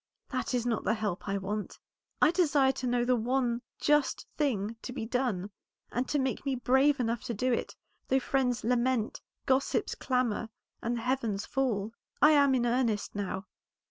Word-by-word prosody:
That - - -1
is 240 -1 0
not 235 -2 0
the 220 - +2
help 210 -4 -3
I 200 - 0
want. 205 +2 -4 0.5
I 300 - +7
desire 295 -6 +3
to 260 -1 -4
know 240 0 +1
the 250 0 +3
one 245 0 0 0.2
just 295 -2 +2
thing 230 -7 0
to - - -6
be 240 -3 -4
done, 225 -6 -1 0.4
and 250 +2 -1
to 295 - +1
be 265 -2 0
made 265 -3 -2
brave 270 +3 +4
enough 235 -1 0
to 235 - -3
do 250 +4 +1
it, - - -2 0.3
though 265 - +3
friends 255 -2 0
lament, 245 -1 +1 0.2
gossips 265 +1 +1
clamor, 250 -4 -1 0.3
and 235 +1 -1
the - - -4
heavens 230 -5 -1
fall. 230 -6 -1 0.3
I 300 - +7
am 280 -3 +5
in 240 -1 +1
earnest 235 -3 0
now. 200 -1 -3
245 Hz, 175 wpm, -30 LUFS, 225-265 Hz, 0.5 s, I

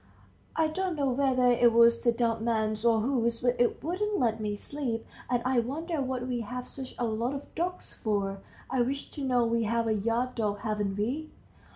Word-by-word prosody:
"I 320 - +3
don't 360 +3 -1
know 280 -3 +1
whether 255 -1 +3
it 240 -1 +5
was 235 0 +5
the 235 - +5
dumb 230 -1 0
man's 220 -2 0
or 230 -2 +4
whose, 235 -2 +1
but 245 0 +2
it 240 - +1
wouldn't 400 +6 -1
let 230 -3 +1
me 210 -1 -1
sleep. 240 -1 -4 0.2
And 245 -1 +1
I 255 -1 +3
wonder 305 +6 -2
what 260 -2 -2
we 250 -1 -1
have 250 +3 -5
such 265 -2 -7
a 240 - 0
lot 230 +4 -1
of 280 - -8
dogs 360 +2 -3
for! 200 -2 -1 0.3
I 260 -1 +1
wish 275 +3 -2
to 285 - -6
know. 250 -3 +3
We 230 0 +1
have 230 +1 +1
a 220 - +2
yard 230 +4 0
dog, 205 -3 -1
haven't 210 -3 -1
we?" 270 +10 -2
240 Hz, 205 wpm, -29 LUFS, 225-270 Hz, 0.3 s, it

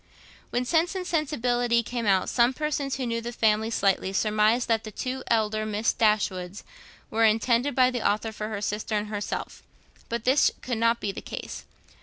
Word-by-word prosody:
When 245 +1 -1
'Sense 335 +6 +1
and 370 -1 -3
Sensibility' 245 -7 +1
came 235 -1 -3
out, 190 -2 +3
some 240 +1 +2
persons, 295 -2 -2
who 265 - -3
knew 230 -1 -2
the 235 +1 -5
family 220 -1 +1
slightly, 195 -3 +1
surmised 215 +3 +2
that 225 -1 +1
the 215 - -7
two 255 +5 -4
elder 215 -1 +1
Miss 215 +1 0
Dashwoods 200 -3 0 0.5
were 225 +1 +2
intended 235 +5 +2
by 255 -1 +4
the 245 -2 -3
author 215 +2 -1
for 215 0 -5
her 215 -2 -4
sister 210 +1 -2
and 210 0 -2
herself; 205 -1 -4 0.5
but 235 -1 -3
this 260 +4 +4
could 245 -3 -2
not 230 +1 +2
be 200 - -1
the - - -8
case. - - -7
230 Hz, 185 wpm, -26 LUFS, 215-250 Hz, 0.5 s, by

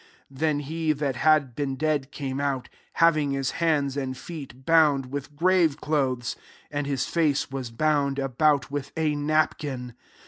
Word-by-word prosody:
44 140 +4 -1
nen 150 -2 +1
he 160 +2 -1
that 140 -3 -2
had 150 -5 +3
been 135 -1 -2
dead 145 -1 -1
€:ame 135 -1 -4
out, 135 -3 -2 0.2
having 155 -3 +3
his 135 -1 -1
hands 145 -5 +2
and 130 -2 -3
feet 135 -6 -9
bound 150 -6 +4
with 145 +1 -5
grave 170 -2 +3
clothes: 130 -6 -1 0.4
and 145 -1 -2
his 135 -2 0
face 150 -5 +1
was 135 -3 -4
bound 140 +2 +1
about 140 +1 +1
with 145 -1 -4
a 155 -2 +1
napkin. 145 -4 -1
145 Hz, 160 wpm, -26 LUFS, 135-155 Hz, 0.4 s, bound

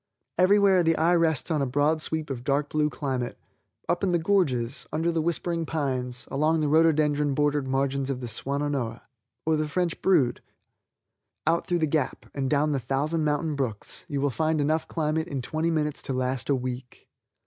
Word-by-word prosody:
Every 185 +3 +6
where 195 -3 +5
the 165 -1 +3
eye 165 +3 +3
rests 165 -1 +1
on 155 -2 +1
a 135 - 0
broad 145 +4 +1
sweep 155 -2 -2
of 120 -2 -5
dark 140 +2 0
blue 150 0 +1
climate. 130 -5 -3 0.5
Up 175 - 0
in 185 -2 +2
the - - +4
gorges, 150 -9 0
under 165 +2 0
the 165 -1 0
whispering 170 +1 -1
pines, 130 -6 -2
along 155 +4 +2
the 150 - +1
rhododendron 150 -2 +3
bordered 145 -1 +1
margins 135 0 0
of 135 -2 -2
the 125 - -5
Swannonoa, 135 0 -2 0.4
or 160 0 +2
the 155 0 -1
French 170 +2 -1
Brood, 155 -11 +3 1.0
out 170 - +1
through 175 - +1
the 160 - +2
Gap, 150 -3 -1
and 135 -2 -2
down 150 +1 +2
the 140 - 0
thousand 150 +5 0
mountain 150 +1 0
brooks, 125 -7 -3
you 145 -4 -2
will 140 0 +1
find 155 +3 0
enough 155 +2 +1
climate 160 +1 -1
in 140 -5 -3
twenty 155 +6 -1
minutes 150 -2 -1
to 135 - -3
last 130 +1 -2
a 140 - +4
week. 125 0 -6
150 Hz, 190 wpm, -26 LUFS, 135-160 Hz, 1.0 s, Every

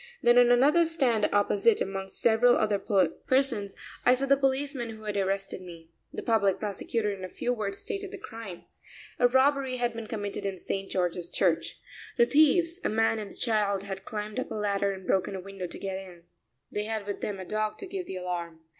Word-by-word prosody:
Then 240 +1 +6
on 245 -1 +6
another 285 +8 +5
stand 265 -10 +1
opposite, 205 +2 +3
amongst 195 0 -3
several 235 +2 +5
other 210 -2 +1
persons, 205 +4 +1 0.3
I 250 - +6
saw 270 +2 -1
the 275 0 +5
policeman 270 -2 0
who 220 -1 -9
had 210 -1 -3
arrested 195 -1 -1
me. 170 -2 -12 0.2
The - - -6
public 200 -5 +2
prosecutor 210 +1 -2
in 190 -1 -8
a 185 - -5
few 245 +6 -2
words 200 -4 -3
stated 400 -3 -4
the 405 - -8
crime. 225 - -9 0.6
A 245 - +6
robbery 265 0 +2
had 240 -1 0
been 230 -1 -6
committed 205 -3 -4
in 195 -1 -2
St. 195 +2 -4
George's 175 -1 -1
Church. - - 0 0.4
The 235 - +6
thieves, 330 +5 +4
a - - +1
man 225 0 +2
and 210 -2 -6
a - - -12
child, 205 -4 +1
had 195 -1 -6
climbed 210 +3 -4
up - - -4
a - - -5
ladder 200 -1 0
and 190 -1 -8
broken 190 +1 0
a - - -4
window 195 -1 -6
to - - -8
get 190 -1 -4
in. 180 -3 -12 0.5
They 210 0 -2
had 220 -2 -3
with 205 -1 -5
them 200 -2 -3
a 185 - -6
dog 215 +2 -2
to 395 - -6
give 375 -1 -5
the - - -5
alarm. 175 -3 -4
210 Hz, 205 wpm, -28 LUFS, 195-245 Hz, 0.6 s, Then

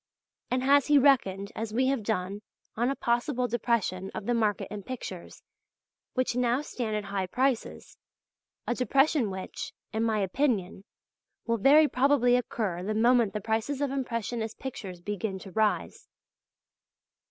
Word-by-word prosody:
And 255 +1 0
has 280 +1 +4
he 295 -1 +6
reckoned, 210 -8 +3
as 220 -1 -4
we 260 +2 +3
have 270 -4 0
done, 200 -1 -2 0.3
on 240 +3 +1
a 275 - -1
possible 245 +1 0
depression 220 -5 -1
of 200 - -5
the 240 - +1
market 215 -4 0
in 210 -1 -5
pictures 195 -5 -8 0.7
which 255 -2 0
now 250 +2 +1
stand 230 -6 -3
at 210 - -2
high 195 -2 -3
prices, 255 +3 -2 0.7
a - - 0
depression 270 0 +2
which, 190 -1 -6 0.2
in 220 - -1
my 220 -1 +1
opinion, 200 -2 -1 0.6
will 230 0 +1
very 290 +8 +6
probably 255 -2 +3
occur 215 -7 -2
the 210 +4 -2
moment 235 -1 +3
the 210 - -3
prices 225 +6 -1
of 285 -2 0
impressionist 230 -4 -3
pictures 195 -9 -7
begin 205 +1 -3
to 190 0 -11
rise. 215 +1 -1
230 Hz, 150 wpm, -28 LUFS, 205-255 Hz, 0.7 s, he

